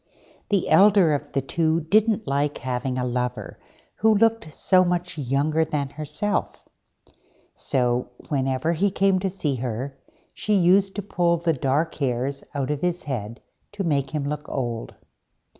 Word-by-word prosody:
The 200 -4 +1
elder 195 -5 +5
of 145 - -3
the 135 - 0
two 160 +3 +1
didn't 215 +6 +2
like 145 +1 0
having 125 0 -3
a 125 - -1
lover 125 0 -3 0.4
who 220 0 +4
looked 225 -5 +2
so 185 +4 +3
much 175 0 -1
younger 145 +3 +1
than 150 -3 -2
herself; 150 +8 -2 0.9
so, 125 -1 0 0.2
whenever 135 +2 0
he 195 +5 +2
came 195 0 +2
to 190 +1 -1
see 150 -8 -2
her, 130 +3 -4 0.3
she 210 - 0
used 190 +1 +4
to 205 - -3
pull 175 -3 +1
the 165 0 +1
dark 145 +4 0
hairs 135 0 -2
out 140 0 -1
of 150 -1 -3
his 175 0 -1
head 115 -4 -5 0.3
to 205 -1 -3
make 140 -5 0
him 145 -1 -3
look 150 0 -4
old. 120 -4 -4
150 Hz, 155 wpm, -24 LUFS, 135-180 Hz, 0.9 s, elder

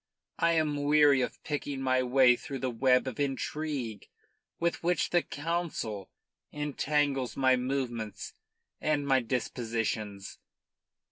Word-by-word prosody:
I 170 0 +3
am 150 -3 +1
weary 145 -2 +5
of - - -4
picking 145 -2 -3
my 130 -1 +2
way 125 0 +5
through 135 +2 -6
the 130 -1 -2
web 125 +2 +3
of 130 -1 -5
intrigue 140 -4 -3 0.5
with 170 0 0
which 175 +1 +1
the 175 - +4
Council 150 - -3 0.4
entangles 145 -2 -1
my 130 -1 +4
movements 125 -4 -3 0.5
and 150 -2 +1
my 135 -1 +4
dispositions. 115 -4 -3
135 Hz, 120 wpm, -30 LUFS, 125-150 Hz, 0.5 s, weary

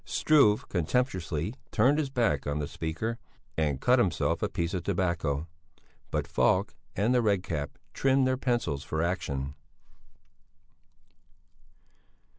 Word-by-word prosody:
Struve 135 -9 +3
contemptuously 90 - -1 0.2
turned 130 +7 +3
his 145 -3 -1
back 115 - 0
on 70 0 -1
the 75 -1 -2
speaker 110 +12 -3 0.4
and 75 -4 0
cut 125 - +4
himself 95 -8 +1
a - - 0
piece 85 +1 -2
of 90 - -1
tobacco. 85 -5 -1 0.6
But - - -1
Falk - - +2 0.2
and 110 +6 +2
the 125 - +4
Red 100 -5 +2
Cap 75 -6 -4 0.2
trimmed 135 0 +3
their 130 0 +2
pencils 120 - -1
for 80 +2 -2
action. 70 -6 -2
90 Hz, 125 wpm, -29 LUFS, 80-125 Hz, 0.6 s, cut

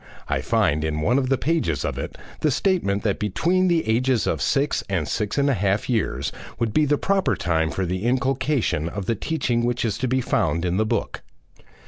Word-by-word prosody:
I - - 0
find, 75 +2 +1
in 75 -1 -1
one 120 - +3
of 130 -2 -1
the 135 - +3
pages 150 - 0
of - - -3
it, - - -6 0.2
the 155 - +2
statement 145 - +1
that 100 -3 0
between 175 - +1
the 170 -6 +1
ages 120 +1 +2
of - - -1
six 140 +2 +1
and 85 -6 -1
six 105 +2 -2
and 140 0 +3
a 140 - +3
half 100 -1 0
years 115 -4 -1 0.3
would 115 -3 -1
be 155 - +4
the 145 0 +2
proper 195 +3 +1
time 80 -2 0
for 95 +2 -2
the 90 +1 -2
inculcation 130 - 0
of 100 +1 -5
the 115 - +1
teaching 120 -1 -1
which 120 0 0
is 110 - -2
to 130 - 0
be 130 +2 +1
found 85 - 0
in 90 +1 0
the 110 +1 +1
book. - - -2
120 Hz, 210 wpm, -23 LUFS, 95-140 Hz, 0.3 s, be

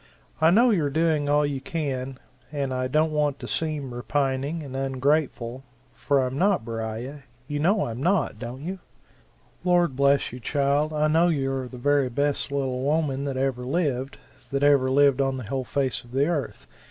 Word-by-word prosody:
I 160 - +6
know 235 +7 +5
you're 160 -9 +1
doing 155 -1 +1
all 145 0 +3
you 140 -2 -3
can, 135 -5 -3 0.3
and 140 -3 -2
I 130 0 -1
don't 155 +4 +2
want 150 -2 0
to - - -8
seem 150 -5 -2
repining 140 +4 -1
and 135 -2 -8
ungrateful 135 -2 -1 0.3
for 135 +2 +1
I'm 130 +2 -3
not, 195 - +2
Beriah 115 +5 -5 0.3
you 145 -1 -3
know 195 +7 +2
I'm 115 +2 -5
not, 170 - +1
don't 125 +4 -7
you?" 185 +3 -5 0.8
"Lord 175 -6 +2
bless 140 +1 +3
you, 125 - -7
child, 145 +3 +1
I 155 0 +1
know 165 +3 +4
you 135 -5 0
are 130 -1 -3
the 125 - -10
very 140 +1 +2
best 140 +3 -1
little 135 -2 -1
woman 140 -1 0
that 135 -2 -3
ever 130 -2 -1
lived 135 -2 -1 0.3
that 140 0 0
ever 140 -2 +4
lived 140 0 +4
on 135 -1 0
the 130 - -5
whole 130 +4 -3
face 135 -2 -1
of 120 0 -17
the 135 +2 +3
Earth! 150 -4 -3
140 Hz, 185 wpm, -25 LUFS, 130-150 Hz, 0.8 s, I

